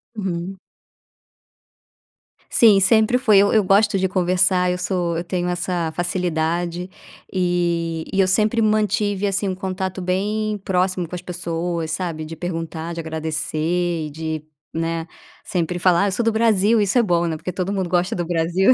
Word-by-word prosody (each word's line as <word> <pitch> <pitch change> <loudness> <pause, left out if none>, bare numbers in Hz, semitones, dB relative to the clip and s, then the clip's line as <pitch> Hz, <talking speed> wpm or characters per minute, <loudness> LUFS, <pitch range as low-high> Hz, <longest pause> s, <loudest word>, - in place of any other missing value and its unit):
Uhum. 190 -1 -4 1.9
Sim, 215 -4 +6
sempre 220 +4 +4
foi. 215 -6 +5
Eu 200 - +4
eu 215 -2 +4
gosto 195 +1 +3
de 190 - +1
conversar, 180 0 +2
eu 180 - -1
sou 180 -2 -1
eu 170 - -2
tenho 180 0 -2
essa 175 -2 -2
facilidade 175 0 -1 0.4
e 170 -3 0
e 195 - 0
eu 190 - +4
sempre 215 +4 +2
mantive, 210 -2 +1
assim, 195 0 0
um 185 - -2
contato 190 0 -4
bem 210 +4 -1
próximo 185 -1 0
com 180 - -6
as 175 - -6
pessoas, 170 -2 -3
sabe, 165 -2 -3
de 165 +1 -7
perguntar, 165 -1 -4
de 165 - -6
agradecer 160 +1 -2
e - - -8
de, 160 0 -4 0.3
né, 165 0 -2 0.4
sempre 175 0 -2
falar: 180 0 +4
"Ah, - - +2
eu - - 0
sou 215 +5 -1
do 230 - +3
Brasil." 220 -1 +3
Isso 205 +4 +1
é 240 - +5
bom, 175 -4 +1
né, 165 -1 -1
porque 180 - -5
todo 185 +2 -2
mundo 190 -3 -2
gosta 180 +1 +1
do 175 - -2
Brasil. 175 +6 +3
180 Hz, 170 wpm, -21 LUFS, 170-195 Hz, 1.9 s, Sim